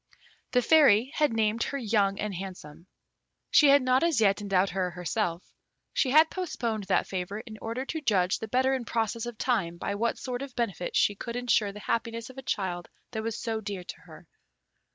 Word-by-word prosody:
The 250 -1 +3
Fairy 270 -6 +5
had 300 -4 +2
named 225 0 0
her 280 - -1
Young 205 -5 +1
and 210 -1 -2
Handsome. 180 -3 -8 0.6
She 295 - +7
had 280 -1 +6
not 255 +1 +3
as 335 -7 +2
yet 200 -1 +3
endowed 195 -1 +1
her 185 -1 -1
herself. 180 0 -3 0.4
She 265 - +1
had 310 +4 +5
postponed 235 - -3
that 190 - +2
favour 190 +3 -4
in 220 -3 -11
order 230 +4 -4
to 320 +3 -4
judge 190 -8 +1
the 220 - -5
better 260 +4 +2
in 260 -2 -1
process 230 0 -2
of 240 -2 -7
time 195 -10 0
by 200 - -3
what 230 +3 -1
sort 250 -1 -4
of 275 -2 -7
benefit 210 -7 -2
she 205 - +3
could 235 +4 -6
ensure 240 -4 +1
the 210 +1 -10
happiness 230 +2 -2
of 265 - -10
a - - -6
child 185 -8 -3 0.2
that 220 -2 -3
was 225 0 -3
so 225 -2 -3
dear 200 -3 -5
to - - -9
her. - - -14
225 Hz, 200 wpm, -28 LUFS, 195-250 Hz, 0.6 s, She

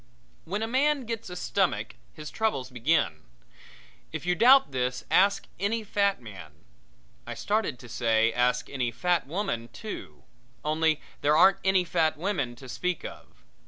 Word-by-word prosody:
When 205 +6 -2
a - - -1
man 275 +2 +1
gets 230 -3 -5
a 180 - -7
stomach 120 -8 -1 0.2
his 150 - -8
troubles 175 - -1
begin. 130 +7 +1 0.9
If - - -5
you 180 - +2
doubt 245 - +6
this 125 -1 -2
ask 200 +2 +4
any 220 +3 0
fat 200 -1 +1
man 95 -10 -11 0.7
I - - -5
started 210 - -1
to 120 - -13
say 115 -1 +2
ask 125 +1 +1
any 125 -3 -2
fat 170 +6 0
woman, 165 - -2
too. - - -9 0.4
Only 155 0 +1 0.2
there 150 +1 +3
aren't 190 +3 +6
any 190 -1 +3
fat 160 -3 +1
women 155 -9 -2
to 130 +2 -12
speak 180 +7 -3
of. - - -11
160 Hz, 155 wpm, -27 LUFS, 125-200 Hz, 0.9 s, doubt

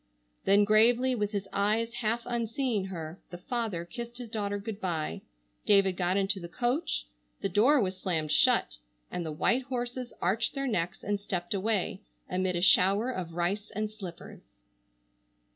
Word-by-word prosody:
Then 200 +1 +5
gravely, 235 +5 +4
with 210 -4 -1
his 200 -2 -3
eyes 220 +3 +1
half 230 +1 0
unseeing 235 -2 -1
her, 170 -2 -6
the 175 - -7
father 220 -5 -3
kissed 235 +5 -7
his 245 -2 -7
daughter 205 -2 -1
good 205 +1 -6
bye, 160 - -2 0.5
David 195 -2 +5
got 180 +1 +1
into 195 0 +1
the 170 - -7
coach, 245 - -1 0.4
the 195 - 0
door 240 +11 +5
was 190 -4 -1
slammed 160 -5 -1
shut, 150 - +3 0.3
and 180 - -3
the 160 - -4
white 240 +12 +1
horses 250 -1 -4
arched 215 +9 0
their 275 0 -1
necks 180 -9 -2
and 205 0 -1
stepped 180 -3 -3
away, 200 -1 0 0.3
amid 185 0 0
a 175 - 0
shower 195 +6 +5
of 180 -8 -5
rice 185 +4 -1
and 215 0 -2
slippers. 190 - -10
205 Hz, 160 wpm, -29 LUFS, 180-235 Hz, 0.5 s, Then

